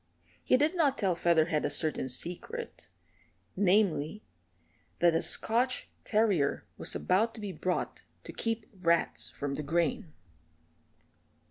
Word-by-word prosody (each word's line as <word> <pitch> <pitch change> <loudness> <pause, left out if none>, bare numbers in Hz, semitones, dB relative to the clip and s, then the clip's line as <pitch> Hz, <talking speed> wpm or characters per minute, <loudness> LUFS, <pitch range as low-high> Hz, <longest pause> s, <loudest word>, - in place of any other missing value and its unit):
He - - +4
did 300 +5 +2
not 295 -6 +2
tell 195 -4 +1
Featherhead 165 -2 +2
a - - +1
certain 155 -4 -1
secret 180 - -5 0.7
namely, 195 -2 +2 0.7
that 170 0 +4
a 165 - +2
Scotch 245 +3 +1
terrier 205 -10 +1
was - - -2
about 215 +6 +1
to - - -9
be 205 -2 -4
bought 180 -1 -2 0.2
to - - -9
keep 225 -1 -1
rats 170 -2 +1
from 140 -1 -4
the 145 - -3
grain. 165 +2 -1
185 Hz, 125 wpm, -30 LUFS, 165-225 Hz, 0.7 s, He